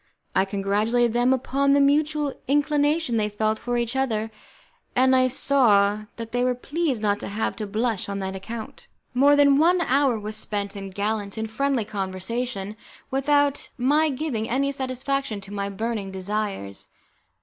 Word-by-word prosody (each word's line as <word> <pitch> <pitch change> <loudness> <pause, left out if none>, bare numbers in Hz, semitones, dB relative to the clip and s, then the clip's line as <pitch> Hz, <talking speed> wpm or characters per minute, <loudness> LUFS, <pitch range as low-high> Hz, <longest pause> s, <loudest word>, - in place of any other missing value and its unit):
I 190 - +4
congratulated 210 +4 +1
them 245 +2 +3
upon 275 +2 +2
the 285 - +4
mutual 295 0 +2
inclination 290 -1 +2
they 210 -1 +1
felt 215 +1 -1
for 245 0 -2
each 235 +1 -2
other, 225 -5 -1 0.6
and 260 +1 +4
I 255 0 +4
saw 215 -6 +3
that 230 -1 -7
they 245 0 +1
were 250 0 +1
pleased 275 -2 -2
not 205 -1 +1
to - - -6
have 210 +2 -2
to 215 -2 -4
blush 220 -1 -1
on 200 - -3
that 190 -1 -4
account. 220 +4 -8 0.3
More 280 +3 +5
than 285 -1 +5
one 350 +3 +4
hour 270 -6 +2
was 210 +1 -4
spent 205 -2 -3
in 195 -1 -6
gallant 205 +1 -3
and 220 0 -3
friendly 270 -1 0
conversation, 200 +2 -4 0.4
without 285 +1 +1
my 295 +5 +3
giving 255 -6 -2
any 275 +3 +1
satisfaction 265 -3 -2
to 195 +1 -10
my 200 -1 -2
burning 210 0 -3
desires. 190 - -4
235 Hz, 160 wpm, -24 LUFS, 205-275 Hz, 0.6 s, More